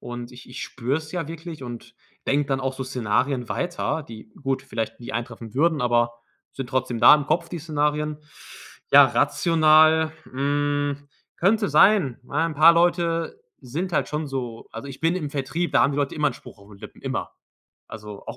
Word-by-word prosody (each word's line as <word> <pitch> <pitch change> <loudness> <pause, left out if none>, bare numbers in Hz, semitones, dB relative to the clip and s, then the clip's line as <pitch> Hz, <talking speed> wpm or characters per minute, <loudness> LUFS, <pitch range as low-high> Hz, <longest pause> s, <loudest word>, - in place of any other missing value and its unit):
und 120 0 -7
ich 125 - -13
ich 125 - -7
spüre 130 +4 -2
es 160 +1 -11
ja 170 -4 -3
wirklich 165 -2 -8
und 120 -2 -9 0.3
denke 145 +1 +1
dann 135 -1 -1
auch 135 0 -2
so 130 0 -5
Szenarien 125 +1 -1
weiter, 175 -2 -2
die 110 -4 -12
gut, 135 -1 -1
vielleicht 115 -3 -5
nie 120 - -7
eintreffen 115 -1 -6
würden, 155 0 +2
aber 120 -1 +2 0.4
sind 135 -3 -6
trotzdem 130 -3 -2
da 120 - +9
im 150 -1 -1
Kopf, 170 +2 0
die 175 - -5
Szenarien. 150 -1 -1 0.7
Ja, - - +10
rational 160 -1 +4
hm, 145 +1 -1 0.3
könnte 205 +3 +2
sein. 150 - +4
Ja, 160 +3 +1
'n 160 - -5
paar 160 +3 +7
Leute 170 - +1 0.2
sind 170 +9 -4
halt - - 0
schon 150 +1 -3
so 125 -4 -5
also, 115 +5 -7
ich 135 - -10
bin 165 +2 +1
im 150 -6 -4
Vertrieb. 150 +5 -2
Da - - +5
haben 140 - +2
die - - -4
Leute 140 -1 -1
immer 150 -1 +2
'n 135 - -6
Spruch - - -14
auf 100 - -17
'n 105 - -14
den - - -22
Lippen. - - -12
Immer. - - -4 0.6
Also, 105 -2 -9
auch - - -7
145 Hz, 195 wpm, -24 LUFS, 125-160 Hz, 0.7 s, Ja